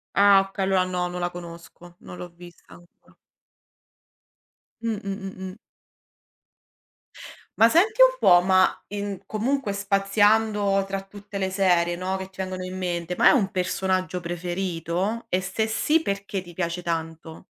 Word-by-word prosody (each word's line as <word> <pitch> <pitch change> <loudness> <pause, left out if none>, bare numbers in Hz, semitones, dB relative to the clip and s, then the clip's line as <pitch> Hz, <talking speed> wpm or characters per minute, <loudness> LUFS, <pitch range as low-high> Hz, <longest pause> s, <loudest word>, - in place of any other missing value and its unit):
Ah, 200 -1 +6
okay, 195 0 -4
allora 190 -1 +2
no, 180 -1 -2
non 180 0 -5
la 175 0 -2
conosco, 175 0 -11
non 180 - -10
l'ho 180 - -8
vista 175 0 -15
ancora. 175 0 -22 1.7
Mh, 225 -2 -2
mh, 200 - -5 0.2
mh, 190 0 -9
mh. - - -13 2.0
Ma 225 +1 +6
senti 435 - +3
un - - +6
po', 175 - +6
ma 185 0 +2
in 200 -2 -5
comunque 230 0 -1
spaziando 200 +1 +2
tra 195 0 -3
tutte 200 0 -10
le 190 -1 -1
serie, 175 -3 +2
no, 185 +2 -3
che 190 0 -8
ti 190 - -22
vengono 185 -1 -4
in 185 - -6
mente, 180 -1 -3
ma - - +4
hai 285 - +5
un 195 -4 -1
personaggio 185 0 -1
preferito? 175 +4 -3
E 185 - +1
se 190 +4 -2
sì, 300 +9 +1
perché 200 -4 -3
ti 175 -1 -13
piace 175 0 -2
tanto? 165 -1 -5
190 Hz, 155 wpm, -24 LUFS, 175-200 Hz, 2.0 s, Ah